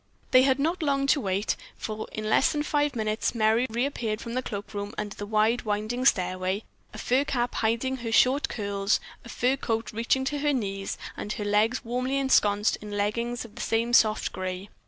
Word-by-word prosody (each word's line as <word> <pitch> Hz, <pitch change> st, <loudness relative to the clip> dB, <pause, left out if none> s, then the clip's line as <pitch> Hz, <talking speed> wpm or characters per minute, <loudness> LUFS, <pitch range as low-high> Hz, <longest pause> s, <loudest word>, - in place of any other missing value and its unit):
They 255 Hz, -, +7 dB
had 265 Hz, 0 st, +3 dB
not 330 Hz, +6 st, 0 dB
long 275 Hz, -2 st, +1 dB
to 280 Hz, +1 st, +3 dB
wait, 195 Hz, +1 st, 0 dB, 0.2 s
for 215 Hz, 0 st, -5 dB
in 215 Hz, 0 st, -4 dB
less 215 Hz, -, +4 dB
than 295 Hz, -1 st, -1 dB
five 295 Hz, -2 st, 0 dB
minutes 215 Hz, +1 st, -1 dB
Merry 225 Hz, +3 st, +3 dB
reappeared 230 Hz, -2 st, -1 dB
from 235 Hz, -, -6 dB
the 255 Hz, -, 0 dB
cloakroom, 205 Hz, -2 st, -5 dB
under 210 Hz, -1 st, -3 dB
the 205 Hz, -, -6 dB
wide, 220 Hz, +3 st, +2 dB
winding 215 Hz, +4 st, -2 dB
stairway, 185 Hz, -1 st, +1 dB, 0.3 s
a -, -, -10 dB
fur 260 Hz, +3 st, +2 dB
cap 245 Hz, -4 st, -1 dB
hiding 235 Hz, +4 st, 0 dB
her 235 Hz, -2 st, -5 dB
short 260 Hz, +5 st, +4 dB
curls, 200 Hz, -1 st, 0 dB, 0.2 s
a 235 Hz, -, -11 dB
fur 250 Hz, +3 st, +1 dB
cloak 225 Hz, -3 st, -2 dB
reaching 235 Hz, +4 st, +1 dB
to 290 Hz, +2 st, -1 dB
her 295 Hz, 0 st, +1 dB
knees 195 Hz, -6 st, -3 dB, 0.2 s
and 210 Hz, -, -4 dB
her 210 Hz, -, -4 dB
legs 215 Hz, +5 st, +2 dB
warmly 255 Hz, +3 st, -1 dB
ensconced 210 Hz, -6 st, +3 dB
in 205 Hz, -1 st, -7 dB
leggins 235 Hz, +4 st, -1 dB
of 220 Hz, -, -14 dB
the 240 Hz, -, -7 dB
same 230 Hz, +1 st, 0 dB
soft 215 Hz, -2 st, +4 dB
grey. 185 Hz, +1 st, -4 dB
225 Hz, 195 wpm, -27 LUFS, 210-255 Hz, 0.3 s, They